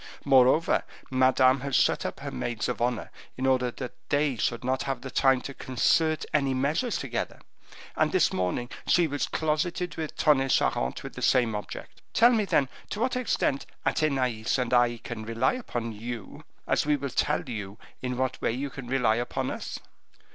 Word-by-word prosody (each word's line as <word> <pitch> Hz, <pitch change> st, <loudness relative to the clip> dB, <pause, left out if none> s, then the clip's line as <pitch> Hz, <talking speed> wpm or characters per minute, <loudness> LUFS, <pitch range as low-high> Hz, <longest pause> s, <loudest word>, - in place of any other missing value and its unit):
Moreover, 135 Hz, +3 st, +4 dB, 0.3 s
Madame 130 Hz, 0 st, +4 dB
has 140 Hz, +1 st, -2 dB
shut -, -, +3 dB
up -, -, -7 dB
her -, -, -5 dB
maids 110 Hz, -, -3 dB
of -, -, -3 dB
honor 120 Hz, -2 st, -1 dB, 0.3 s
in 130 Hz, -, -2 dB
order 130 Hz, -1 st, +2 dB
that 125 Hz, +1 st, -7 dB, 0.2 s
they 145 Hz, -2 st, +2 dB
should 115 Hz, -, -1 dB
not 130 Hz, +1 st, 0 dB
have 130 Hz, 0 st, -3 dB
the 135 Hz, -, -7 dB
time 135 Hz, -2 st, +3 dB
to 140 Hz, -, -7 dB
concert 155 Hz, +5 st, +1 dB
any 140 Hz, -3 st, +2 dB
measures 150 Hz, -, 0 dB
together, 125 Hz, -4 st, -4 dB, 0.6 s
and -, -, +2 dB
this -, -, +3 dB
morning 95 Hz, +7 st, -1 dB, 0.2 s
she 175 Hz, -, +4 dB
was 145 Hz, -2 st, -1 dB
closeted 165 Hz, +3 st, -1 dB
with 160 Hz, -2 st, -5 dB
Tonnay 135 Hz, -3 st, +3 dB
Charente 65 Hz, -, +1 dB
with -, -, -7 dB
the -, -, -8 dB
same 120 Hz, -3 st, +3 dB
object. 105 Hz, 0 st, -7 dB
Tell 235 Hz, +2 st, +7 dB
me, 220 Hz, -4 st, +2 dB
then, 140 Hz, -7 st, +2 dB, 0.2 s
to 205 Hz, -, -4 dB
what 250 Hz, +2 st, 0 dB
extent 235 Hz, -, 0 dB, 0.2 s
Athenais 130 Hz, -8 st, +1 dB
and 125 Hz, -1 st, -1 dB
I 120 Hz, -1 st, +4 dB
can 115 Hz, -1 st, -7 dB
rely 115 Hz, +3 st, +1 dB
upon 120 Hz, -, -4 dB
you, 115 Hz, 0 st, -7 dB, 0.2 s
as -, -, +2 dB
we 150 Hz, 0 st, +2 dB
will 140 Hz, -1 st, -4 dB
tell 150 Hz, +5 st, 0 dB
you 105 Hz, -4 st, -5 dB, 0.2 s
in 125 Hz, -1 st, -3 dB
what 130 Hz, 0 st, -1 dB
way -, -, +1 dB
you 135 Hz, +3 st, -3 dB
can 125 Hz, -1 st, -8 dB
rely 120 Hz, -4 st, +2 dB
upon 120 Hz, 0 st, -2 dB
us?" -, -, -5 dB
130 Hz, 185 wpm, -27 LUFS, 120-145 Hz, 0.6 s, Tell